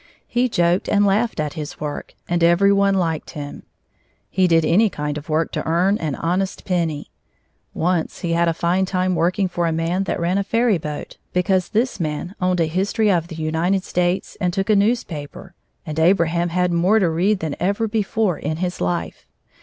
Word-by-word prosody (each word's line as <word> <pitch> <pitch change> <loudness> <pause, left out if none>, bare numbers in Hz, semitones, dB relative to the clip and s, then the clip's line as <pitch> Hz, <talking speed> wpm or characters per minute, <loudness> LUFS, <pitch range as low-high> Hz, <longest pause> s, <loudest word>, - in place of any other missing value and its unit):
He 245 +1 +1
joked 175 -3 +1
and 205 0 +3
laughed 210 +1 +1
at 150 -1 -2
his 150 -3 -7
work, 150 -1 -5
and 175 -1 0
every 175 +4 +5
one 200 0 +3
liked 165 -4 -1
him. 145 -1 -7 0.7
He 185 -1 +3
did 165 -2 +3
any 205 +7 +4
kind 150 -4 -4
of 150 +1 -8
work 155 +1 0
to - - -3
earn 180 +6 +2
an 150 -4 -2
honest 185 +3 -2
penny. 165 -5 -2 0.6
Once 175 -1 -1
he 170 -1 -1
had 170 0 +2
a 165 - +2
fine 180 +3 +1
time 185 0 0
working 180 +3 +1
for 175 -1 -1
a - - 0
man 165 +4 -1
that - - -2
ran 175 +3 +1
a - - 0
ferry 230 -2 +2
boat, 150 -1 -6 0.2
because 180 0 +1
this 230 0 0
man 155 +3 -3
owned 180 -1 +1
a - - +3
history 195 +6 +1
of 170 -3 +1
the 170 - -8
United 165 +4 0
States 180 +1 -1
and 180 -2 +1
took 195 +3 0
a - - +5
newspaper, 190 -6 -1 0.3
and 155 -1 -4
Abraham 170 0 +2
had 180 +1 +1
more 180 +6 +3
to 195 -5 +3
read 180 +6 +1
than 160 -3 -3
ever 200 +5 0
before 215 -3 0
in 155 +2 -3
his 180 +1 -3
life. 85 -2 -3
175 Hz, 195 wpm, -21 LUFS, 165-195 Hz, 0.7 s, every